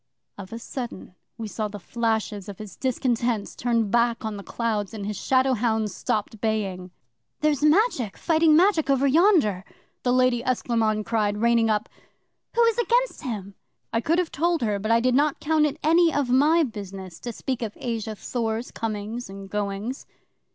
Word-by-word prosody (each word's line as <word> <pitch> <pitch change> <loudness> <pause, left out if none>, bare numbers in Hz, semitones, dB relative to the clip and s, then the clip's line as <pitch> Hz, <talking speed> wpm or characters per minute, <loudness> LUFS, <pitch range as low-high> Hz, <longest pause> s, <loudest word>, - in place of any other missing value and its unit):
'Of 195 -1 -10
a 230 - -5
sudden 235 -5 -7 0.2
we 225 -2 -5
saw 215 +1 -3
the 205 0 -8
flashes 220 -2 -2
of 200 - -8
his 215 -2 -9
discontents 240 -4 -1
turned 230 -4 0
back 235 -1 +2
on 220 -1 -3
the 200 - -6
clouds, 215 -1 -2
and 205 -2 -5
his 210 0 -3
shadow 260 +6 +2
hounds 220 -3 0
stopped 215 +1 -2
baying. 195 -5 -2 0.5
'"There's 300 -2 +2
Magic 300 - +2
fighting 320 -2 +4
Magic 335 -4 +3
over 275 0 +3
yonder," 280 - +4 0.4
the 245 - +1
Lady 255 -1 +3
Esclairmonde 225 -4 0
cried, 210 -3 0
reigning 230 0 +3
up. 210 -1 +1 0.7
"Who 470 - +5
is 460 0 +2
against 485 +1 +1
him?" 210 -8 -5 0.4
'I 230 - +1
could 325 +7 +1
have 360 -2 0
told 335 -1 +1
her, 210 -3 0
but 215 +2 -3
I 230 0 +4
did 255 +1 +2
not 290 +2 +2
count 305 0 +2
it 295 +1 -5
any 330 +2 +5
of 280 -5 0
my 305 +6 +5
business 195 - -7
to 240 - -5
speak 255 +2 -4
of 220 -3 -4
Asa 225 -3 -3
Thor's 225 +1 -3
comings 220 +1 -4
and 195 0 -9
goings. 210 +5 -3
230 Hz, 175 wpm, -25 LUFS, 210-275 Hz, 0.7 s, Who